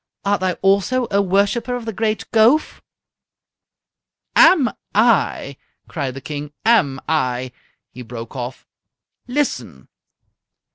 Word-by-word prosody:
Art 200 Hz, +1 st, +1 dB
thou 185 Hz, -1 st, 0 dB
also 200 Hz, +6 st, +2 dB
a 200 Hz, 0 st, +3 dB
worshipper 200 Hz, +6 st, 0 dB
of 245 Hz, -2 st, -6 dB
the 225 Hz, -, -4 dB
great 215 Hz, -2 st, -1 dB
Gowf?" 230 Hz, +8 st, +3 dB, 1.5 s
"Am 280 Hz, -11 st, +6 dB, 0.2 s
I!" 210 Hz, -, +2 dB, 0.3 s
cried 140 Hz, -6 st, -4 dB
the 135 Hz, -, -7 dB
King. 145 Hz, +1 st, -6 dB
"Am 160 Hz, -13 st, +3 dB
I!" 130 Hz, -5 st, -1 dB, 0.4 s
He 125 Hz, -, -10 dB
broke 115 Hz, +1 st, -9 dB
off. 125 Hz, 0 st, -6 dB, 0.6 s
"Listen!" 185 Hz, -, -3 dB
195 Hz, 110 wpm, -20 LUFS, -, 1.5 s, Am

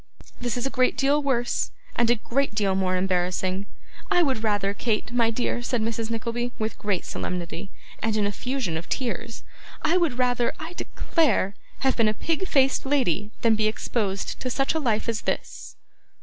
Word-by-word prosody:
This 245 Hz, -1 st, -1 dB
is 245 Hz, -, -1 dB
a 270 Hz, -, -1 dB
great 255 Hz, -2 st, +2 dB
deal 285 Hz, +2 st, +3 dB
worse, 245 Hz, -4 st, 0 dB, 0.3 s
and 235 Hz, -1 st, +3 dB
a 240 Hz, -, +6 dB
great 245 Hz, +1 st, -1 dB
deal 200 Hz, -3 st, +2 dB
more 185 Hz, -1 st, +1 dB
embarrassing. 185 Hz, +1 st, 0 dB, 0.4 s
I 355 Hz, -, +5 dB
would 260 Hz, -7 st, 0 dB
rather, 205 Hz, -2 st, +1 dB
Kate, 220 Hz, +2 st, -1 dB
my 235 Hz, -2 st, +3 dB
dear,' 240 Hz, +1 st, -1 dB
said 245 Hz, 0 st, 0 dB
Mrs. 225 Hz, 0 st, -1 dB
Nickleby, 235 Hz, +1 st, -2 dB
with 220 Hz, -1 st, -3 dB
great 205 Hz, -4 st, -1 dB
solemnity, 180 Hz, +1 st, -4 dB, 0.3 s
and 220 Hz, -1 st, +1 dB
an 210 Hz, -, +2 dB
effusion 210 Hz, -3 st, -1 dB
of 165 Hz, -, -7 dB
tears: 235 Hz, -3 st, -3 dB, 0.4 s
'I 330 Hz, +4 st, +4 dB
would 330 Hz, -9 st, +1 dB
rather, 245 Hz, -1 st, +2 dB
I 320 Hz, +2 st, -6 dB
declare, 310 Hz, -, +1 dB, 0.3 s
have 265 Hz, -1 st, +3 dB
been 230 Hz, -2 st, +4 dB
a 215 Hz, -, -1 dB
pig 330 Hz, -, -1 dB
faced 270 Hz, -4 st, +3 dB
lady, 240 Hz, -, +1 dB
than 230 Hz, -1 st, +5 dB
be 215 Hz, 0 st, +2 dB
exposed 210 Hz, -3 st, -2 dB
to 255 Hz, -, -2 dB
such 270 Hz, +3 st, +1 dB
a 320 Hz, -, 0 dB
life 230 Hz, -7 st, 0 dB
as 230 Hz, -2 st, 0 dB
this! -, -, -4 dB
230 Hz, 180 wpm, -25 LUFS, 205-260 Hz, 0.4 s, a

